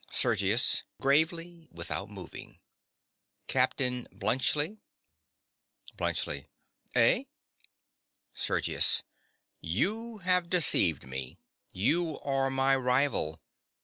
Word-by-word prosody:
SERGIUS. 100 +5 +3 0.2
(gravely, 165 +4 +1
without - - -4
moving). - - -11 0.9
Captain 125 -1 0
Bluntschli. 150 - 0 1.2
BLUNTSCHLI. - - -2 0.5
Eh? 275 - +4 1.1
SERGIUS. - - +2 0.6
You 225 +2 -3
have 180 -1 +2
deceived 135 - +4
me. 65 0 -6 0.3
You 155 - -1
are 135 -1 -1
my 135 0 +2
rival. 125 - 0
140 Hz, 75 wpm, -29 LUFS, 125-170 Hz, 1.2 s, Eh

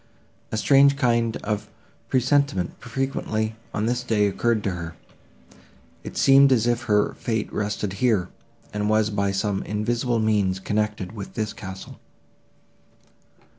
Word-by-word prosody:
A 110 - -1
strange 140 +4 +5
kind 115 -4 +1
of 105 -1 -3 0.4
presentiment 130 -7 +2
frequently, 115 -3 -2 0.2
on 105 - -1
this 120 +1 0
day, 110 -4 +1
occurred 110 +2 0
to 100 - 0
her;—it 80 -6 -12
seemed 135 0 +6
as 120 -3 +3
if 120 +1 0
her 105 -2 +2
fate 110 -3 -3
rested 105 -1 -2
here, 105 -8 +2 0.4
and 105 0 -1
was 110 0 +2
by 100 -1 0
some 100 0 -1
invisible 120 +3 -1
means 105 -4 +1
connected 105 -1 -2
with 105 -3 -8
this 105 -1 -2
castle. 95 -4 -9
110 Hz, 130 wpm, -24 LUFS, 100-120 Hz, 0.4 s, seemed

